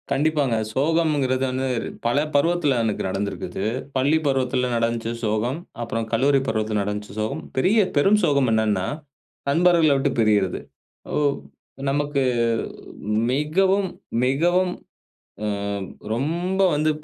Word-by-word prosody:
கண்டிப்பாங்க. 140 -3 +1 0.2
சோகம்ங்கிறது 145 -3 +1
வந்து 130 +1 -1 0.4
பல 120 +3 +2 0.2
பருவத்தில 150 -2 +2
எனக்கு 110 -2 -1
நடந்திருக்குது. 95 0 -3 0.3
பள்ளி 140 +5 +3
பருவத்தில 130 -2 +1
நடந்துச்சு 115 0 -1
சோகம். 110 +7 -1 0.2
அப்புறம் 115 -1 -3
கல்லூரி 135 +4 +3
பருவத்தில 110 -1 0
நடந்துச்சு 105 0 -5
சோகம். 125 +9 -2
பெரிய 190 +11 +3 0.2
பெரும் 195 +8 +5
சோகம் 140 -6 +3
என்னான்னா, 105 -4 +1 0.6
நண்பர்கள 165 0 +4
விட்டு 135 - +1
பிரியிறது. 105 -4 +2 0.5
ஓ! - - 0 0.7
நமக்கு 145 0 0 1.1
மிகவும் 190 +8 +2 0.4
மிகவும், 175 +7 +2 0.7
ஆ - - 0 0.7
ரொம்ப 170 +9 -1
வந்து 155 +1 +2
135 Hz, 105 wpm, -23 LUFS, 115-155 Hz, 1.1 s, பெரும்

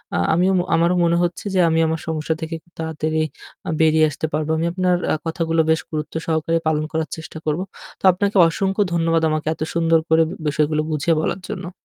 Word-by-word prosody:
আ - - +1 0.2
আমিও, 180 +3 +3 0.2
আমারও 170 +2 +3
মনে 170 0 +3
হচ্ছে 175 +3 -3
যে - - +3
আমি 160 0 +2
আমার 160 0 -1
সমস্যা 160 0 -1
থেকে 160 +1 -4
খুব 170 - -30
তাড়াতাড়ি 160 0 -2 0.5
আ - - -2
বেরিয়ে 155 0 +5
আসতে 150 +2 -4
পারবো। 155 +1 -1 0.2
আপনার 180 -1 +2 0.2
আ - - +2
কথাগুলো 165 0 0
বেশ 160 - +2
গুরুত্ব 155 -1 -4
সহকারে 160 0 +1
পালন 155 -1 +1
করার 160 -1 -2
চেষ্টা 160 0 -9
করবো। 155 +4 0 0.4
তো - - -30
আপনাকে 200 +3 -1
অসংখ্য 195 +4 -1
ধন্যবাদ 165 -1 +2
আমাকে 155 0 -2
এত 160 - -17
সুন্দর 165 -1 +3
করে 160 0 +5 0.2
বিষয়গুলো 150 +1 +1
বুঝিয়ে 155 +2 +1
বলার 175 - -2
জন্য। 180 -1 -6
160 Hz, 195 wpm, -21 LUFS, 155-170 Hz, 0.5 s, বেরিয়ে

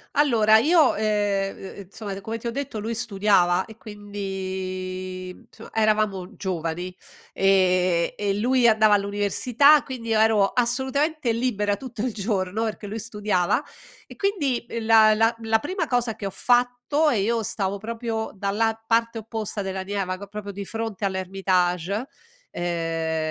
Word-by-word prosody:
Allora 230 -7 +5
io, 310 +4 +4
ehm, 205 -2 0
uhm, 195 - -9
insomma 200 0 -7
come 225 +3 -5
ti 235 - -5
ho - - -1
detto 275 -3 -4
lui 225 +2 -3
studiava 195 -5 +2
e 220 - -13
quindi 185 -3 -5
insomma 215 +4 -13
eravamo 215 -3 0
giovani 175 -1 -4 0.4
e 185 -3 +2
e 205 -1 0
lui 250 +2 +3
andava 215 -2 +5
all'università, 205 +8 +3
quindi 245 -4 -7
io 220 -1 +3
ero 220 -2 +4
assolutamente 265 +4 0
libera 220 -4 0
tutto 245 -2 -7
il 255 - -1
giorno 205 -1 -2
perché 215 -2 -4
lui 210 +2 -5
studiava 210 -5 0 0.4
e - - -12
quindi 295 - -1
il 230 -1 -4
la 220 -1 +6
la 225 +2 +2
la 225 0 +2
prima 365 - -2
cosa 245 -3 0
che 210 - -7
ho 195 - -3
fatto 245 - +2
e 225 - +1
io 225 +2 0
stavo 195 -1 -2
proprio 225 +1 -4
dalla 220 +3 -1
parte 230 0 +1
opposta 220 -1 -4
della 190 -1 -4
Neva 190 -1 -3
ca 200 - -8
proprio 205 0 -7
di 200 0 -6
fronte 225 -2 -4
all'Hermitage, 190 +1 0 0.5
ehm 165 -2 -2
210 Hz, 150 wpm, -24 LUFS, 195-230 Hz, 0.5 s, la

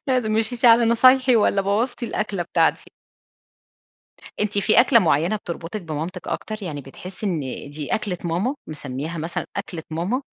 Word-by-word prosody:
لازم، 250 -5 +1
مشيتِ 225 +3 0
على 235 0 +7
نصايحي، 255 +2 +5
والّا 200 -2 +2
بوظتِ 225 +6 -1
الأكلة 210 -5 -2
بتاعتي؟ 170 - 0 1.5
أنتِ 210 -1 0
في 215 +3 +5
أكلة 240 -1 +5
معينة 170 +2 +2
بتربُطك 175 +2 -6
بمامتِك 165 +3 -5
أكتر؟ 215 -1 -4
يعني 150 -6 -5
بتحسّي 180 +10 -8
إن 175 -5 -1 0.3
دي 145 -1 -3
أكلة 200 -5 -3
ماما، 180 - -1
مسمّياها 150 +2 -5
مثلًا 165 +2 -3
أكلة 185 -4 -5
ماما؟ 180 - -2
200 Hz, 145 wpm, -22 LUFS, 165-230 Hz, 1.5 s, على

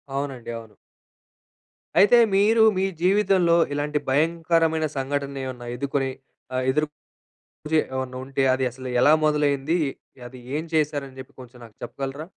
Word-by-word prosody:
అవునండి, 135 -4 -4
అవును. 110 -2 -12 1.2
అయితే 225 +4 +7 0.2
మీరు 220 +3 +4
మీ 190 - +1 0.2
జీవితంలో 185 -3 +3 0.2
ఇలాంటి 150 +1 -1
భయంకరమైన 160 +2 +1
సంఘటన 140 +1 -3
ఏమైనా 120 -2 -7
ఎదుర్కొని 135 +1 -1 0.5
ఆహ్, 130 - 0
ఎదురు 150 +2 0 0.9
చి 160 - +5 0.2
ఏమన్నా 130 -1 -4
ఉంటే 135 0 -2
అది 130 - -1
అసలు 130 +1 -8
ఎలా 150 - +6
మొదలైంది? 150 +1 +1 0.5
అది 130 0 -13 0.2
ఏం 155 - -3
చేశారని 145 -3 -1
చెప్పి 130 - -12
కొంచెం 125 0 -13
నాకు 110 - -16
చెప్పగలరా? 140 +3 -6
145 Hz, 130 wpm, -24 LUFS, 130-160 Hz, 1.2 s, అయితే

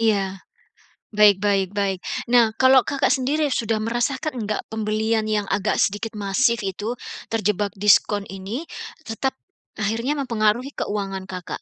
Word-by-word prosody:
Iya. 220 -3 +3 1.0
Baik 205 -2 +7
baik 195 -2 +2
baik. 195 -2 -1 0.3
Nah, 235 -3 +5
kalau 260 -1 +7
Kakak 280 - +1
sendiri 290 +3 +1
sudah 225 -3 0
merasakan 240 +3 -1
enggak 215 0 -2
pembelian 220 0 0
yang 210 -2 -1
agak 200 +1 +1
sedikit 210 +3 0
masif 215 +3 +1
itu, 205 +4 -3 0.4
terjebak 210 -2 0
diskon 205 0 +3
ini, 200 - -6 0.3
tetap 265 +1 -2 0.5
akhirnya 225 +6 0
mempengaruhi 235 +1 0
keuangan 195 -2 -3
Kakak? 185 -3 -6
215 Hz, 130 wpm, -23 LUFS, 200-240 Hz, 1.0 s, Baik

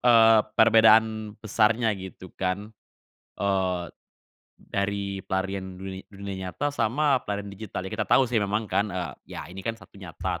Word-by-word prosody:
eee, 115 -2 +7 0.2
perbedaan 110 -1 +5
besarnya 110 +1 +2
gitu 95 -1 -10
kan, 95 +3 -3 0.7
eee, 95 -2 0 0.8
dari 100 0 -2
pelarian 95 0 -3
duni 95 0 -7
dunia 100 -2 -6
nyata 145 +9 -2
sama 140 +2 +2
pelarian 100 -1 -3
digital? 100 -2 -6
Ya 95 - -6
kita - - -2
tahu 135 - +5
sih 115 -2 +1
memang 105 +2 0
kan, 105 0 0
eee, 90 -5 -4 0.2
ya - - -4
ini 95 - -7
kan 115 +4 -3
1 100 -3 -16
nyata, 90 -4 -4
100 Hz, 150 wpm, -26 LUFS, 95-110 Hz, 0.8 s, eee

